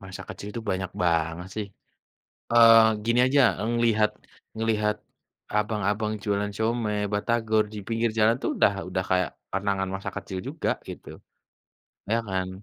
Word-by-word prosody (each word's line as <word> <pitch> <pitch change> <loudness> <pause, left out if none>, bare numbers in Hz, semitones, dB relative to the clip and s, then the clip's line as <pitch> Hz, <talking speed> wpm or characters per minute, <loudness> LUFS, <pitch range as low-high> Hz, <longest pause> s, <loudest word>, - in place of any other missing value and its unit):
Masa 95 0 -8
kecil 100 - -7
itu 115 - -4
banyak 95 -1 -2
banget 85 0 0
sih, 105 -2 -3 0.9
eee, 115 -2 +7
gini 120 +1 +2
aja 140 +2 +4 0.2
ngelihat- 115 -2 +2 0.5
ngelihat, 105 -1 0 0.6
abang-abang 105 0 0
jualan 105 0 -1
siomay, 110 -1 -1
batagor 110 0 +1
di - - -6
pinggir 115 0 0
jalan 110 +2 +5
tuh - - -1
udah 100 - +4 0.2
udah 95 0 -1
kayak 90 -2 +2 0.2
kenangan 95 -1 -1
masa 95 - -5
kecil 95 -2 -6
juga 155 +3 -2 0.2
gitu, - - -9 1.0
ya 115 - +3
kan? 95 -1 -1
105 Hz, 140 wpm, -26 LUFS, 95-115 Hz, 1.0 s, eee